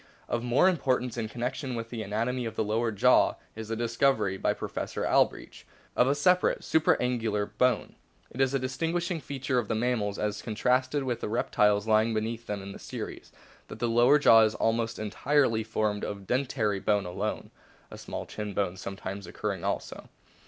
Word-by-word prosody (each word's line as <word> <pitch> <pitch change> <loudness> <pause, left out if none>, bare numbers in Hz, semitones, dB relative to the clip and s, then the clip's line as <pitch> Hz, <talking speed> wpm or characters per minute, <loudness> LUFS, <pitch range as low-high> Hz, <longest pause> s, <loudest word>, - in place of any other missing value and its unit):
Of 120 - -1
more 120 +8 +3
importance 130 -8 0
in 115 -2 -3
connection 125 +2 -3
with 115 0 -5
the 115 -2 -4
anatomy 115 +4 -2
of 110 -1 -5
the 110 - 0
lower 110 +2 0
jaw 105 - +4 0.2
is 110 0 -7
the 115 - -2
discovery 115 -3 +1
by - - 0
Professor - - -4
Albrecht - - +1 0.3
of 125 - +4
a 140 - +2
separate 180 +5 +2
supra 160 -1 +3
angular 115 -4 0
bone. 115 +3 0 0.4
It 130 - -3
is 135 -1 +3
a - - +4
distinguishing 165 +6 -2
feature 135 -2 -1
of 115 - -3
the 115 - -1
mammals, 110 -3 0
as 105 0 -2
contrasted 130 +5 0
with 125 -3 -2
the - - -3
reptiles 105 -2 +2
lying 110 +1 +3
beneath 115 +2 -3
them 100 -2 -4
in 100 - -7
the - - -10
series, - - -7 0.4
that - - -9
the 120 - -1
lower 120 +5 +5
jaw 115 -6 +7
is 110 -1 +2
almost 115 0 0
entirely 115 +2 +1
formed 110 -1 -1
of 100 - -3
a - - -14
dentary 115 -2 -1
bone 105 -1 +1
alone 90 0 -4 0.4
(a - - -8
small - - -6
chin 105 -2 -6
bone 95 -2 -1
sometimes 100 +1 -6
occurring - - -4
also). - - -4
115 Hz, 185 wpm, -28 LUFS, 105-125 Hz, 0.4 s, jaw